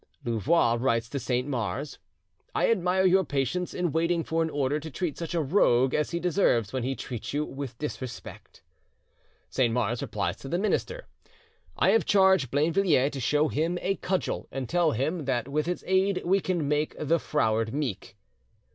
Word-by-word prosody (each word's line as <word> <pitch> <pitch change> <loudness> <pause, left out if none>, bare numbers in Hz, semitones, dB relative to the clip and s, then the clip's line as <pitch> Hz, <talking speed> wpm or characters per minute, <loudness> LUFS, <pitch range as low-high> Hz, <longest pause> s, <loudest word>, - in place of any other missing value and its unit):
Louvois 120 - +2
writes 115 -2 +1
to 140 - -3
Saint 125 +1 -1
Mars: 130 +2 -3 0.6
"I - - +3
admire 190 -2 +2
your 190 +1 +5
patience 140 +4 -2
in 175 -3 -1
waiting 165 +2 +1
for 165 +1 -1
an 160 - 0
order 145 0 0
to 160 +1 -7
treat 160 0 -3
such 170 0 -5
a 165 - +2
rogue 130 -5 +3
as 150 - +1
he 170 - -2
deserves, 155 - +1
when 130 - -1
he 130 +3 -2
treats 120 -1 -6
you 150 +1 0
with 135 -4 -7
disrespect." 130 -4 -7 0.9
Saint 125 -3 +2
Mars 120 -1 0
replies 100 -2 -2
to 135 - -9
the 175 - 0
minister: 345 - -1 0.7
"I - - +4
have 225 - +3
charged 190 - +4
Blainvilliers 150 -1 +2
to 140 - -5
show 145 +5 +2
him 165 +4 -1
a 195 +1 -1
cudgel 190 0 -2
and 135 -2 -4
tell 170 0 +2
him 150 +6 -2
that 125 -3 -1
with 150 +3 -1
its 180 - -3
aid 190 +1 +1
we 190 +3 +3
can 175 -6 -1
make 150 +1 0
the 160 +3 +1
froward 110 -8 0
meek." 105 -9 -4
150 Hz, 180 wpm, -27 LUFS, 125-175 Hz, 0.9 s, your